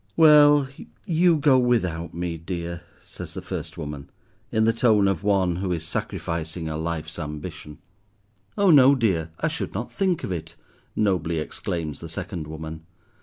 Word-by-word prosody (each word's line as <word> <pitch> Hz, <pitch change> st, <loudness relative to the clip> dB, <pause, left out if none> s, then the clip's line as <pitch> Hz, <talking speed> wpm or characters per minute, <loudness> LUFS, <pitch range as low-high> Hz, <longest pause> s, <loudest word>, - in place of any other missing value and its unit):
"Well, 150 Hz, -3 st, +7 dB, 0.4 s
you 170 Hz, 0 st, +3 dB
go 140 Hz, -3 st, +4 dB
without 90 Hz, -10 st, 0 dB
me, 85 Hz, -1 st, -2 dB
dear," 85 Hz, +1 st, -5 dB, 0.2 s
says -, -, -9 dB
the -, -, -4 dB
first -, -, -6 dB
woman, 75 Hz, -2 st, -6 dB, 0.4 s
in 110 Hz, -, +2 dB
the 115 Hz, +1 st, +3 dB
tone 110 Hz, -4 st, +4 dB
of 95 Hz, -1 st, -1 dB
one 95 Hz, -4 st, +2 dB
who 95 Hz, 0 st, -2 dB
is 80 Hz, -2 st, -2 dB
sacrificing 80 Hz, +1 st, -4 dB
a 80 Hz, -, -3 dB
life's 80 Hz, 0 st, -4 dB
ambition. 75 Hz, 0 st, -7 dB, 0.8 s
"Oh 200 Hz, -3 st, +5 dB
no, 140 Hz, -2 st, +7 dB
dear, 95 Hz, -, 0 dB
I -, -, +2 dB
should -, -, -4 dB
not 115 Hz, +5 st, -4 dB
think 185 Hz, -4 st, 0 dB
of -, -, -3 dB
it," 80 Hz, -1 st, -5 dB, 0.4 s
nobly 90 Hz, -6 st, +1 dB
exclaims 80 Hz, 0 st, -4 dB
the -, -, -8 dB
second 80 Hz, -3 st, -5 dB
woman. 80 Hz, 0 st, -7 dB
90 Hz, 160 wpm, -24 LUFS, 80-120 Hz, 0.8 s, Well